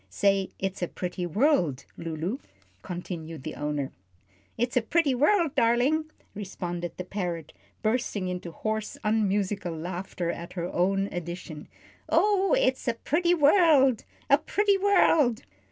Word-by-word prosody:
"Say 195 - +2
'It's 195 0 -3
a 175 - 0
pretty 180 0 -4
world,' 180 - +2
Lulu," 165 - -4 0.4
continued 165 -4 -6
her 155 - -6
owner. 150 -2 -2 0.7
"It's 240 +1 -1
a 250 - +4
pretty 295 +3 +2
world, 310 +4 +3
darlin'," 260 +4 +3 0.3
responded 175 -4 -5
the 180 - -4
parrot, 175 -4 -4 0.3
bursting 215 -4 0
into 180 -1 -4
hoarse, 215 +4 -3
unmusical 200 -4 0
laughter 175 +1 -3
at 170 0 -8
her 175 -2 -3
own 195 +2 +2
addition. 175 -2 -6 0.4
"Oh, 405 +1 +3
it's 260 - +1
a 235 - +1
pretty 345 +9 +1
world 295 - +5 0.2
a - - +5
pretty 405 -1 +1
world!" 330 - +4
200 Hz, 130 wpm, -27 LUFS, 175-270 Hz, 0.7 s, world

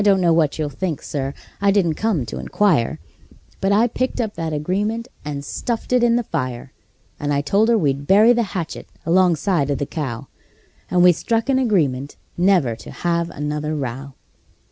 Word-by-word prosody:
I - - +1
don't 200 -2 +4
know 170 -2 +3
what 160 -3 +2
you'll 155 -2 -1
think, 165 +2 -3
Sir 140 -1 -3 0.3
I 200 - +3
didn't 195 -5 +3
come 185 - 0
to 110 - -6
inquire 175 - +1 0.6
But 195 - +1
I 210 +4 +4
picked 255 +2 -2
up 220 -3 -1
that 165 -1 -3
agreement 205 +10 -1 0.2
and 145 -1 -5
stuffed 235 - -3
it 250 - +4
in 235 -1 +4
the 240 - +1
fire; 130 - -4 0.5
And 145 0 -2
I 140 0 +1
told 200 +10 +2
her 235 - +4
we'd 140 -5 0
bury 215 +5 +6
the 240 - +1 0.2
hatchet 170 -3 -5 0.2
alongside 175 -3 +2
of 140 - 0
the 145 - -2
cow; 135 -7 -5 0.6
And 180 -1 +3
we 180 - +8
struck 225 - -1
an 260 -1 +3
agreement 145 - 0 0.2
never 175 - +3
to - - -11
have 170 -1 -1
another 150 0 -3
row. 135 0 -5
170 Hz, 190 wpm, -21 LUFS, 145-205 Hz, 0.6 s, we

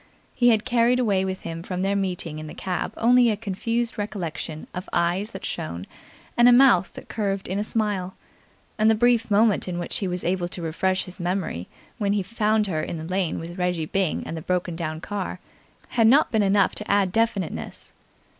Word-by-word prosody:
He 245 -1 +4
had 220 -1 +3
carried 245 0 +3
away 200 -6 +2
with 190 0 -3
him 165 0 -5
from 180 +1 -3
their 200 +1 +1
meeting 180 -5 -2
in 155 - -7
the - - -9
cab 185 -2 -3
only 245 +1 +5
a 215 - 0
confused 230 +3 -2
recollection 170 -6 -4
of 180 +1 -6
eyes 175 +5 +1
that 190 - -8
shone 95 - -4 0.5
and 240 +1 +6
a - - +7
mouth 245 -7 +5
that - - -10
curved 200 -3 -2
in 190 +2 -2
a - - 0
smile; 205 -4 -1 0.6
and 215 +1 +5
the 220 - +5
brief 240 0 +3
moment 210 -1 +3
in 180 -1 -3
which 175 - -2
he 195 - -1
was 180 0 -2
able 180 0 0
to 180 - -7
refresh 185 +4 0
his 185 +2 -9
memory, 175 - -2 0.3
when 200 -2 +1
he 205 -2 0
found 215 +1 +1
her 160 -6 -1
in 170 - -4
the 155 - -6
lane 180 0 -1
with 175 +3 -7
Reggie 180 -3 0
Byng 190 +1 -1
and - - -5
the 160 - -5
broken 180 0 -1
down 160 -1 -4
car, 195 -1 -4 0.5
had 225 -2 +3
not 275 +6 +5
been 220 - +2
enough 200 -1 +3
to 210 - -4
add 200 -2 +3
definiteness. 215 -5 -2
195 Hz, 205 wpm, -24 LUFS, 175-220 Hz, 0.6 s, a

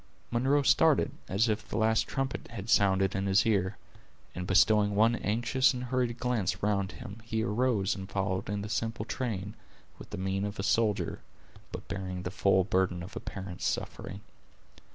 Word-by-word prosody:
Munro 135 +5 +2
started, 160 +2 +4 0.2
as 100 +5 +2
if 110 -1 -2
the - - -3
last 110 0 +2
trumpet 135 -1 -3
had 100 +4 -6
sounded 95 -1 +3
in 95 0 -1
his 95 0 +4
ear, 100 -3 +1 0.6
and 90 0 -5
bestowing 105 +1 +4
one 110 +3 +4
anxious 120 +5 +2
and 125 - -4
hurried 125 -1 -1
glance 120 -8 0
around 100 -1 0
him, 100 +4 -9
he 110 -1 -2
arose 110 -2 +1
and 95 -1 -7
followed 95 -1 -2
in 100 0 -2
the - - -5
simple 110 0 -2
train, 105 -6 -3 0.5
with - - -11
the - - -6
mien 95 +1 -1
of 105 0 -4
a 95 - -3
soldier, 105 +2 +1 0.5
but - - -7
bearing 95 -1 -4
the 90 - -4
full 95 -1 +3
burden 90 -2 0
of 95 - -10
a - - -3
parent's 95 -2 -5
suffering. 100 - -4
105 Hz, 175 wpm, -30 LUFS, 95-115 Hz, 0.6 s, started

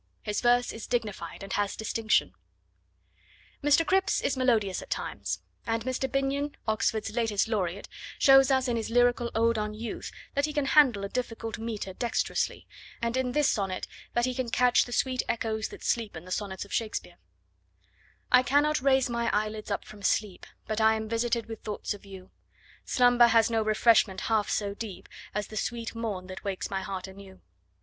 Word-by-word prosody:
His 210 -1 -2
verse 245 0 +3
is 225 - -7
dignified, 210 -8 -3
and 195 - -6
has 205 -1 0
distinction. 220 0 +1 1.3
Mr. 295 +3 +4
Cripps 385 +4 +2
is - - 0
melodious 225 -7 +1
at - - -12
times, - - -3 0.2
and 225 0 0
Mr. 260 +1 -1
Binyon, 275 +1 -1
Oxford's 220 0 0
latest 225 -3 +1
Laureate, 200 -4 -2 0.3
shows 270 0 +7
us 265 -1 +2
in 240 -1 0
his 225 - -3
lyrical 245 0 +3
ode 230 0 +2
on 210 0 -3
Youth 225 +1 -6 0.2
that 280 0 +2
he 305 - -4
can 290 -2 0
handle 270 -8 +5
a - - -1
difficult 225 -2 -4
metre 220 -4 -4
dexterously, 235 +5 -1 0.3
and 235 +1 -1
in 255 -1 0
this 295 0 +3
sonnet 195 -3 -2 0.3
that 240 0 +2
he 255 - -1
can 250 -1 -2
catch 250 +1 +4
the 245 - -10
sweet 255 +1 +1
echoes 220 -1 -1
that - - -12
sleep 225 -5 -1
in 160 - -10
the 185 - -11
sonnets 195 0 -3
of 200 - -11
Shakespeare: 225 -2 -3 1.1
I 250 - +8
cannot 290 +3 +2
raise 265 -1 +3
my 235 -1 -1
eyelids 215 0 -2
up 200 - -2
from 210 -1 -12
sleep, 200 -1 -1 0.2
But 215 0 -2
I 220 0 +5
am 220 0 -4
visited 230 0 0
with 225 0 -8
thoughts 210 0 -3
of 205 0 -13
you; 190 -1 -11 0.5
Slumber 245 -1 +5
has 230 0 +4
no 225 -1 +2
refreshment 215 -2 +3
half 220 -3 +1
so 200 -1 -1
deep 205 -3 -7 0.3
As 210 0 -1
the 215 - -7
sweet 230 +1 -3
morn, 220 -5 -4
that 185 0 -9
wakes 195 0 -3
my 195 -1 -1
heart 190 0 -5
anew. 190 0 -13
225 Hz, 185 wpm, -28 LUFS, 205-245 Hz, 1.3 s, I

